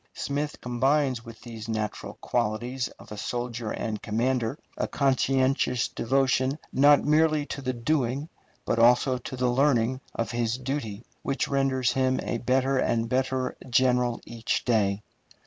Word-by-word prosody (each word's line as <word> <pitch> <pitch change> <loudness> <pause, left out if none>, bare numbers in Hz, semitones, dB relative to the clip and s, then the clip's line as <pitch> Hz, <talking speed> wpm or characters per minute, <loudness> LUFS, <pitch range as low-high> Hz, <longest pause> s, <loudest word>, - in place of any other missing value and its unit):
Smith 145 +1 -3
combines 130 0 +1
with 115 -1 -11
these 115 -2 -8
natural 110 -1 -3
qualities 120 +2 -1
of - - -15
a 105 - -6
soldier 120 0 -3
and 110 -1 -3
commander 120 +3 0 0.2
a - - -1
conscientious 130 -2 +1
devotion 135 +2 +1 0.2
not 145 +2 +5
merely 155 0 +3
to 140 - -6
the 130 -1 -1
doing 130 +2 -1 0.4
but 115 - 0
also 125 +2 +4
to 125 - -7
the 125 0 0
learning 130 -1 +2
of 115 - -2
his 120 0 -1
duty, 125 -5 -4 0.2
which 135 - -1
renders 135 -2 +1
him 130 -1 +1
a 120 - -2
better 130 +2 +1
and 115 -2 0
better 130 0 0
general 125 -1 +2
every 115 -1 -10 0.2
day. 105 -4 +1
125 Hz, 145 wpm, -27 LUFS, 115-135 Hz, 0.4 s, not